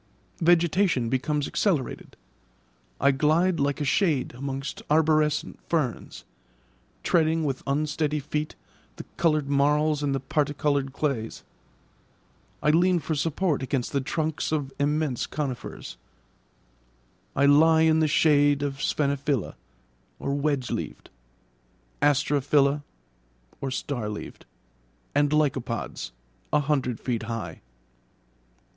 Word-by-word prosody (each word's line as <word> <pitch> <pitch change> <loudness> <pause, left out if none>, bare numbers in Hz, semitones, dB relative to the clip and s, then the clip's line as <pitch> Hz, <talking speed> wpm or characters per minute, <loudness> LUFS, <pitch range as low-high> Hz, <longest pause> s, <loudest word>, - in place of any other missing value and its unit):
Vegetation 170 - +3
becomes 140 +3 0
accelerated. 165 - -1 0.8
I 140 - +4
glide 160 +6 +2
like 140 0 0
a 145 - -1
shade 150 - +1
amongst 135 +2 -5
arborescent 155 -1 +2
ferns, 150 -8 -2 0.8
treading 160 -1 +2
with 135 -2 -2
unsteady 150 +1 0
feet 150 +1 -3 0.4
the - - -8
coloured 155 -4 +2
marls 150 +2 +2
and 140 -2 0
the - - -1
particoloured 145 -1 0
clays; 135 -6 -3 1.2
I 150 - +4
lean 180 +3 +4
for 160 0 -2
support 160 +1 0
against 130 -1 -2
the 140 - 0
trunks 155 +3 -2
of 145 -3 -2
immense 145 -2 0
conifers; 135 - -5 1.4
I 140 - +3
lie 160 +3 +6
in 160 0 +4
the 155 - +3
shade 145 -1 +3
of 140 -1 -2
sphenophylla 140 -5 0 0.6
(wedge 140 -2 -1
leaved), - - -5 0.9
asterophylla 145 0 +3 0.9
(star 130 -4 -3
leaved), 105 -10 -8 0.7
and 145 0 +3
lycopods, 135 - -1 0.4
a 150 - +3
hundred 135 -5 -1
feet 120 -3 -2
high. 115 0 -5
145 Hz, 105 wpm, -26 LUFS, 135-155 Hz, 1.4 s, lie